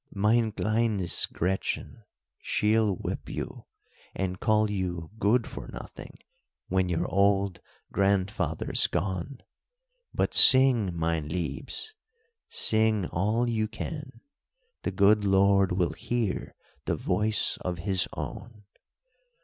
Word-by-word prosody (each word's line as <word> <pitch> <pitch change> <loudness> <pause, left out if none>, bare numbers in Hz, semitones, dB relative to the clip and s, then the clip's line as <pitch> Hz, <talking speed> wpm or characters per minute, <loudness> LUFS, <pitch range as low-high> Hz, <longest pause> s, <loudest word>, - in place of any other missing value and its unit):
"Mein 110 +3 +2
kleines 110 -4 +1
Gretchen, 95 +5 -3 0.4
she'll 105 -1 +1
whip - - -5
you, - - -6 0.5
and 95 -1 -3
call 110 -1 +2
you 90 -4 -3
Good 115 +3 +2
for - - -8
Nothing - - -10 0.5
when 95 -1 +1
your 85 - -1
old 100 -1 +1 0.3
grandfather's 100 +1 0
gone; 95 +8 -3 0.7
but - - -1
sing, 130 -6 +7
mein 80 -2 -1
liebes, 90 - -3 0.6
sing 110 -3 +1
all 110 +7 0
you 110 -2 0
can; 135 +5 -7 0.6
the - - -2
good 105 +1 +4
Lord 100 -1 +3
will 90 -3 0
hear 115 +3 -3 0.3
the - - 0
voice 105 0 0
of 90 -1 -4
his 95 0 +1
own. 110 -3 -7
100 Hz, 110 wpm, -27 LUFS, 95-110 Hz, 0.7 s, sing